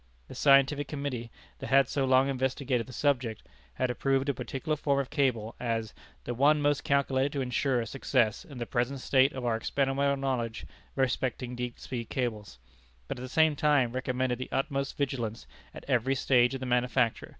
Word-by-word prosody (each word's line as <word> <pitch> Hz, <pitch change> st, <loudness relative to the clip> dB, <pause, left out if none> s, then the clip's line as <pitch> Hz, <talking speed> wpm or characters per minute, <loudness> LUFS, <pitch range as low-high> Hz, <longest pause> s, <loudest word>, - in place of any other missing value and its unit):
The -, -, -10 dB
Scientific 140 Hz, +1 st, +4 dB
Committee, 140 Hz, -5 st, -4 dB, 0.3 s
that -, -, -6 dB
had 135 Hz, 0 st, +5 dB
so 135 Hz, -2 st, 0 dB
long 130 Hz, +1 st, +4 dB
investigated 130 Hz, -2 st, -1 dB
the -, -, -10 dB
subject, 125 Hz, -4 st, 0 dB, 0.3 s
had 125 Hz, -, 0 dB
approved 135 Hz, +2 st, 0 dB
a -, -, +2 dB
particular 150 Hz, +4 st, -3 dB
form 140 Hz, -2 st, 0 dB
of 135 Hz, -, -3 dB
cable, 125 Hz, -7 st, 0 dB
as 115 Hz, -2 st, -2 dB, 0.3 s
"the 120 Hz, -, -3 dB
one 145 Hz, +5 st, +4 dB
most 145 Hz, -1 st, +1 dB
calculated 140 Hz, 0 st, +1 dB
to 140 Hz, -, -1 dB
insure 125 Hz, -1 st, 0 dB
success 120 Hz, -2 st, 0 dB
in 140 Hz, -, -11 dB
the 120 Hz, -, -3 dB
present 120 Hz, +4 st, -1 dB
state 135 Hz, +1 st, +4 dB
of 130 Hz, -2 st, -5 dB
our 115 Hz, -2 st, +1 dB
experimental 140 Hz, +4 st, 0 dB
knowledge 125 Hz, -4 st, -2 dB, 0.3 s
respecting 125 Hz, -2 st, -1 dB
deep 120 Hz, -1 st, -4 dB
sea 125 Hz, -3 st, -5 dB
cables," 110 Hz, -, -4 dB, 0.5 s
but -, -, -5 dB
at -, -, -8 dB
the 130 Hz, -, -6 dB
same 160 Hz, +2 st, +3 dB
time 145 Hz, -5 st, +2 dB
recommended 130 Hz, -1 st, -1 dB
the 130 Hz, -, -5 dB
utmost 135 Hz, 0 st, -2 dB
vigilance 120 Hz, -6 st, -2 dB, 0.3 s
at -, -, -11 dB
every 130 Hz, 0 st, +1 dB
stage 125 Hz, -1 st, +3 dB
of 135 Hz, -, -6 dB
the -, -, -3 dB
manufacture. 125 Hz, -1 st, +1 dB
130 Hz, 180 wpm, -29 LUFS, 120-140 Hz, 0.5 s, had